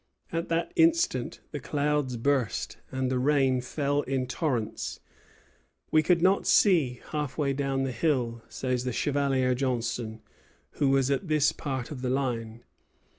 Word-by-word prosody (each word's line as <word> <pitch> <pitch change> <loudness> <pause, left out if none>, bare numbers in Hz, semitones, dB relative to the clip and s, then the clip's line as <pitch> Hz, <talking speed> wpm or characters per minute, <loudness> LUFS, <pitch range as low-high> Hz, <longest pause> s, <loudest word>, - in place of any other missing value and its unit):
At 165 0 -2
that 165 - 0
instant 335 0 +2
the - - -4
clouds 145 -4 -1
burst, 130 -1 0
and 130 -1 -1
the 130 - +1
rain 135 -2 +2
fell 145 +2 -1
in 130 -2 -1
torrents. 125 -7 -2 0.9
"We 155 - +5
could 170 +2 +2
not 190 +2 +3
see 150 - +4
half 150 -3 -3
way 140 -3 +1
down 135 -1 -1
the 135 - -1
hill," 120 -3 0
says 125 -1 -2
the 125 -1 -2
Chevalier 135 -2 +1
Johnstone, 120 -3 -2 0.6
who 140 -2 +3
was 135 0 +3
at 155 +7 -1
this 150 -2 +3
part 130 -3 -4
of 135 -4 -6
the 130 - -1
line. 120 -4 -2
135 Hz, 150 wpm, -28 LUFS, 125-150 Hz, 0.9 s, We